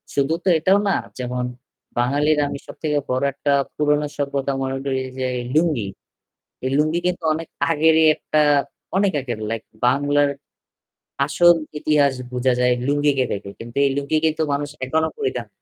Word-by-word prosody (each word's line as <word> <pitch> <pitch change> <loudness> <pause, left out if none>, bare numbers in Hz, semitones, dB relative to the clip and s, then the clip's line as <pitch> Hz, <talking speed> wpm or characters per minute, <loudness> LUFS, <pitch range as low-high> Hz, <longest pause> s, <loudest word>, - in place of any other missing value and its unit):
শুধু 140 +2 +2
তো - - -5
এটাও 185 +5 +3
না 195 - +3 0.3
যেমন 125 0 -2 0.5
বাঙালির 145 +5 +2
আমি 140 - -4
সবথেকে 150 -2 -2
বড় 130 +1 0
একটা 145 +1 -1 0.2
পুরনো 150 0 +2
সভ্যতা 140 -1 -1
মনে 135 0 -2
করি 130 -1 0 0.2
যে 130 - -1 0.3
লুঙ্গি। 155 -10 +2 0.8
এই 130 - 0
লুঙ্গি 155 +3 +2
কিন্তু 180 0 -1
অনেক 165 +1 -5 0.2
আগেরই 160 0 +4
একটা 155 - 0 0.6
অনেক 195 -1 +3
আগের 120 -4 -5
লাইক 115 -1 -3 0.2
বাংলার 145 +2 +3 1.0
আসল 175 +4 +5 0.2
ইতিহাস 145 -2 +3 0.2
বুঝা 125 +1 +1
যায় 125 0 +4
লুঙ্গিকে 145 -2 +2
দেখে। 100 -1 -6
কিন্তু 120 +2 -9
এই - - +3
লুঙ্গি 145 +2 0
কিন্তু 160 0 +1
মানুষ 145 +1 -2 0.2
এখনো 160 +4 +1
পরিধান 425 -2 -2
145 Hz, 150 wpm, -21 LUFS, 130-155 Hz, 1.0 s, আসল